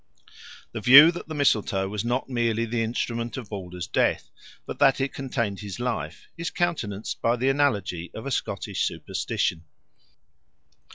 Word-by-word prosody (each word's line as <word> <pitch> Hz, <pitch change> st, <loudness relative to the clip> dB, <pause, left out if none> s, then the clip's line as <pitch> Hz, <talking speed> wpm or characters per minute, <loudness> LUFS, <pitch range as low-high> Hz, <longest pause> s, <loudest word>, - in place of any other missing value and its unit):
The 110 Hz, -, -5 dB
view 140 Hz, +9 st, +9 dB
that 175 Hz, -, -8 dB
the 155 Hz, -, -6 dB
mistletoe 110 Hz, -8 st, +1 dB
was 105 Hz, +1 st, -3 dB
not 120 Hz, +2 st, -1 dB
merely 115 Hz, -2 st, 0 dB
the 115 Hz, 0 st, -1 dB
instrument 115 Hz, +1 st, -2 dB
of 120 Hz, -6 st, -7 dB
Balder's 90 Hz, -3 st, -6 dB
death, -, -, 0 dB, 0.3 s
but -, -, -7 dB
that 135 Hz, -, +4 dB
it 135 Hz, 0 st, -1 dB
contained 115 Hz, -7 st, -3 dB
his 100 Hz, +1 st, -7 dB
life, 100 Hz, -11 st, -4 dB
is 165 Hz, 0 st, -3 dB
countenanced 115 Hz, -, -2 dB
by 115 Hz, +1 st, +2 dB
the 130 Hz, +2 st, +1 dB
analogy 105 Hz, -12 st, 0 dB
of 110 Hz, -, -7 dB
a 140 Hz, -, -3 dB
Scottish -, -, -2 dB
superstition. 85 Hz, -1 st, -2 dB
115 Hz, 155 wpm, -25 LUFS, 100-135 Hz, 0.3 s, view